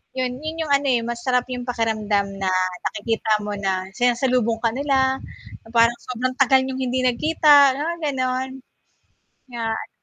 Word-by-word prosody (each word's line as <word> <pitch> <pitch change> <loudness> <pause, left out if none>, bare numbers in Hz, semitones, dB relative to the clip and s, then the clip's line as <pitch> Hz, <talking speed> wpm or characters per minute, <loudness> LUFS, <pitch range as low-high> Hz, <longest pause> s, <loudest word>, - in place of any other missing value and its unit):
'yon, 255 -1 -2
'yon 315 +2 -5
yung 300 - -5
ano, 280 0 +2
eh, 245 -3 +2
masarap 240 +1 -1
yung 250 -1 -4
pakiramdam 215 -4 0
na, 190 -1 -1 0.4
nakikita 215 0 -1
mo 210 - -4
na 190 -2 -1
sinasalubong 245 -2 +1
ka 230 - +3
nila, 265 0 +1 0.5
na - - -15
parang 235 +1 +4
sobrang 255 +1 -3
tagal 265 0 +5
niyong 265 0 -4
hindi 255 0 -1
nagkita, 285 +1 +5
mga 325 +5 -3 0.2
gano'n. 255 0 -1 1.0
Nga 235 -1 -5
an - - -7
250 Hz, 155 wpm, -22 LUFS, 230-265 Hz, 1.0 s, tagal